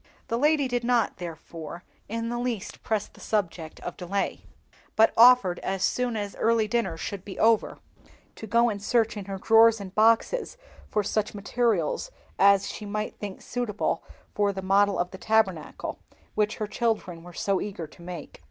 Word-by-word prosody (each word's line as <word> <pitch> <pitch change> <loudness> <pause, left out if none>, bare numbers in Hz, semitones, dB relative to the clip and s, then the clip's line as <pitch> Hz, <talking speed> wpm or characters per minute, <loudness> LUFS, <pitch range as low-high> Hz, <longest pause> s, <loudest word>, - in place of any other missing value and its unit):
The 230 - 0
lady 295 -1 +3
did 245 -1 -1
not, 240 -2 +1
therefore, 170 -1 -8 0.3
in 230 +1 -2
the 240 0 -2
least 240 -5 -4
press 215 -2 -1
the - - -20
subject 170 -6 -2
of 175 - -6
delay, 195 +2 -2 0.5
but 220 +1 +5
offered, 235 -6 +6
as 190 -1 -2
soon 245 -2 0
as 205 -1 -4
early 225 -1 +2
dinner 210 -7 -1
should 195 +2 -5
be 200 - -8
over, 225 -1 +3 0.6
to 220 - -7
go 235 +3 +4
and 200 -1 -5
search 225 +1 +1
in 205 -2 -6
her 195 0 -5
drawers 225 +2 +5
and 190 -2 -8
boxes 230 - +2 0.3
for 210 - +1
such 210 +1 -1
materials 210 - 0 0.3
as 200 0 +5
she - - -6
might 210 +1 -4
think 200 -2 -7
suitable 240 -4 -2 0.3
for 205 -1 +2
the 190 -1 -6
model 200 +1 +3
of 180 +1 -1
the 190 - -9
Tabernacle, 195 -8 0 0.3
which 210 0 +1
her 215 - -3
children 210 -6 -2
were 175 +1 -11
so 195 +2 0
eager 195 -5 -5
to 155 - -16
make. 170 -3 -8
210 Hz, 175 wpm, -26 LUFS, 190-230 Hz, 0.6 s, offered